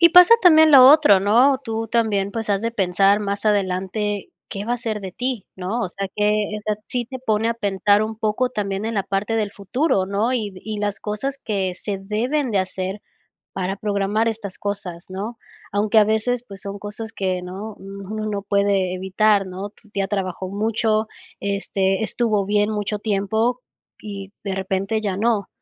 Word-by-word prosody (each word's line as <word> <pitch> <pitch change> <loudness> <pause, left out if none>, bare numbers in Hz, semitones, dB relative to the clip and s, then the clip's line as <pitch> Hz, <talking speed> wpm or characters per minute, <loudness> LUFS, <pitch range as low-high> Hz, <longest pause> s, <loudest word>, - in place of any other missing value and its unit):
Y 340 - +8
pasa 360 +6 +9
también 315 -3 +7
lo 260 -2 +10
otro, 295 -11 +6
¿no?, 245 +7 +4
tú 225 -1 -3
también, 205 -4 0
pues, 225 -2 -3
has 200 +1 +1
de 230 - 0
pensar 195 0 +3
más 200 +1 -3
adelante, 200 0 -1 0.2
¿qué 200 0 -5
va 235 - -1
a - - +1
ser 225 -3 -3
de 190 -2 -7
ti?, 250 -3 -3
¿no?, 190 +6 -3
o 190 - -1
sea, 195 +2 -5
que 210 0 +1
esa 210 0 -3
sí 245 -1 -1
te 260 +2 -7
pone 220 -2 +1
a 230 - 0
pensar 205 -1 +2
un 220 0 -4
poco 220 +4 0
también 200 -3 -3
en 225 0 -2
la 195 -1 0
parte 200 +3 -1
del 210 -2 0
futuro, 200 - 0
¿no?, 210 +5 0
y 215 -5 -2
y 215 0 -4
las 205 -1 -2
cosas 240 +7 -3
que 190 -4 -1
se 195 +1 -4
deben 240 +8 -1
de 205 - +1
hacer 185 +1 -3 0.5
para 190 0 -2
programar 205 +2 0
estas 210 -4 -5
cosas, 195 -4 -4
¿no? 210 +5 -5 0.4
Aunque 210 +2 +3
a 210 - +7
veces, 230 +3 0
pues, 195 -1 -10
son 200 0 -6
cosas 215 +2 -6
que, 185 -3 -2
¿no?, 200 +4 -7
uno 200 +2 -6
no 205 -2 -2
puede 200 -2 +1
evitar, 195 +2 +2
¿no?, 190 +2 -6
tu 215 - -24
tía 195 -1 -1
trabajó 190 -2 -3
mucho, 215 +1 0 0.3
este, 195 -1 0
estuvo 215 -3 +1
bien 205 +1 +2
mucho 210 0 -2
tiempo, 220 +4 0 0.4
y 200 -1 -8
de 195 - -2
repente 190 +3 -1
ya 200 -3 -2
no, 215 -2 +1
205 Hz, 185 wpm, -22 LUFS, 195-225 Hz, 0.5 s, lo